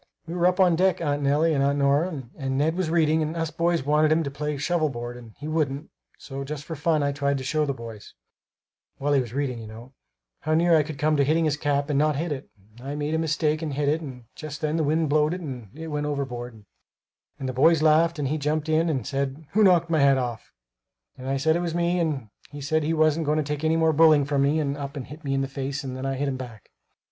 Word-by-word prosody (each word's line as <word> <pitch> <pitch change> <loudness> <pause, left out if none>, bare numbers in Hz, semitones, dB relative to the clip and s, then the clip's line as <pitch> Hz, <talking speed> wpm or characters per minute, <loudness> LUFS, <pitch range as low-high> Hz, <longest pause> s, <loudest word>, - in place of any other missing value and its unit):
"We 165 - -6
were 175 0 +2
up 180 +1 +1
on 180 -3 +5
deck, 185 +2 +2
Aunt 145 -3 -1
Nellie 150 +4 +2
and 140 -2 +2
Aunt 140 +1 +2
Nora, 145 +2 +1
and 135 -2 -3
Ned 155 +4 +1
was 185 -3 -1
reading 160 -1 +3
and 155 +1 -2
us 165 -1 -2
boys 170 -2 0
wanted 150 +1 +3
him 160 +1 +3
to 140 - -4
play 150 +1 -3
shovel 155 +2 0
board 120 -1 -6
and 115 -3 -13
he 150 - -7
wouldn't; 150 -2 -2 0.3
so 135 0 -7
just 145 +1 -6
for 160 - -6
fun, 155 0 +1
I 140 - +1
tried 140 0 0
to 130 - -5
show 150 +3 0
the 140 - 0
boys 115 -3 -10 0.8
while 145 +1 0
he 140 - +4
was 120 -4 -6
reading, 135 -4 -1
you 110 - -8
know 115 +4 -11 0.5
how 155 0 0
near 170 +1 +4
I 155 - +5
could 150 -1 -6
come 150 +2 +2
to 140 - +4
hitting 160 +4 +2
his 150 -2 +1
cap, 145 -1 0
and 140 - +2
not 150 0 +2
hit 165 +3 -2
it; 140 -1 -5 0.3
and 130 - -10
I 145 - -3
made 150 +1 -2
a 160 - +1
mistake 155 -1 0
and 150 -4 -3
hit 145 0 0
it 155 +3 +1
and 130 -5 -8
just 155 0 -8
then 155 0 0
the 165 - +1
wind 155 +2 +1
blowed 150 +3 +2
and 130 - -7
it 160 0 -6
went 150 -1 -2
overboard, 125 -6 -5 0.7
and 135 - -4
the 130 - -3
boys 155 +5 +4
laughed 160 +2 +4
and 145 -2 -1
he 155 +3 -1
jumped 150 +2 -1
up - - +2
and 135 -8 -1
said, 140 +2 -3
'Who 215 +2 +3
knocked 175 -4 +4
my 160 - +3
hat 140 -1 +5
off?' 120 -4 -4 0.6
and 130 +1 -7
I 135 - +1
said 160 +4 +2
it - - +1
was 170 -1 -2
me, 175 +1 +1
and 145 -9 -2 0.2
he 145 - -9
said 155 +3 0
he 160 +2 0
wasn't 155 0 +2
going 150 +1 +2
to 155 - +1
take 150 +1 -4
any 160 +1 +2
more 160 -1 +3
bullying 155 -2 +5
from 140 -1 0
me 145 +3 +2
and 140 -2 -1
up 140 0 -6
and 130 - -5
hit 150 +4 -11
me 135 -1 -1
in 135 - +1
the 135 - -1
face 140 +1 -4
and 130 -1 -5
then 130 +1 -4
I 135 - -1
hit 140 +2 -1
him 135 -1 -2
back. 120 -5 -10
150 Hz, 270 wpm, -25 LUFS, 135-160 Hz, 0.8 s, on